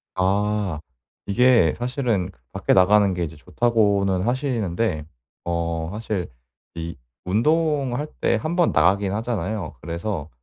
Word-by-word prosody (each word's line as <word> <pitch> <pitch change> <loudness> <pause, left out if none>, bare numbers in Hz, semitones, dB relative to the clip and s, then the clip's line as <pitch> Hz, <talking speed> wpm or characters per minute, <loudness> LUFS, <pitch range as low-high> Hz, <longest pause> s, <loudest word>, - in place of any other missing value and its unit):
아 100 -2 0 0.5
이게 115 -5 +4
사실은 120 -7 -1 0.2
밖에 - - +1
나가는 100 +1 +5
게 90 -1 -2
이제 80 -1 -5
좋다고는 100 +2 +1
하시는데 115 - -1 0.4
어 85 -1 -2
사실 105 -4 -3 0.5
이 85 0 -5 0.3
운동할 145 - +1
때 - - +3
1 155 +10 -2
번 175 -2 +3
나가긴 95 +5 +3
하잖아요. 105 -6 -3
그래서 85 -1 -4
100 Hz, 235 characters per minute, -23 LUFS, 85-120 Hz, 0.5 s, 나가는